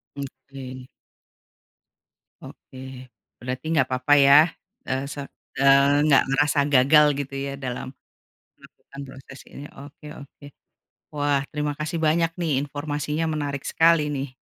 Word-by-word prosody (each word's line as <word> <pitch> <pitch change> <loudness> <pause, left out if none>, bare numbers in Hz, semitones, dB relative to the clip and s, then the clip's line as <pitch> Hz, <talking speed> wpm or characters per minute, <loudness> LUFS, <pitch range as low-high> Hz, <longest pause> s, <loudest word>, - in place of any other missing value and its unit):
Oke. 130 -2 -9 1.6
Oke, 130 - -14 0.6
berarti 130 +4 -6
nggak 140 -5 +2
apa-apa 130 +3 +1
ya, 140 +1 +7 0.5
eee, 130 +1 -2
se - - -9 0.4
eee, 140 +1 +4
nggak 145 -3 +5
merasa 145 +2 +1
gagal 140 +4 +6
gitu 140 -1 -6
ya - - -5
dalam 130 -3 -6 0.7
melakukan 140 - -15
proses 135 +1 -13
ini, 140 - -10
oke 145 +2 -13
oke. 140 0 -15 0.7
Wah 145 -1 +1
terima 150 0 -2
kasih 150 +2 -4
banyak 165 +2 +2
nih, 165 -2 -1
informasinya 145 +2 -4
menarik 140 -2 -4
sekali 165 -1 +3
nih. 140 -1 -3
140 Hz, 120 wpm, -23 LUFS, 135-150 Hz, 1.6 s, ya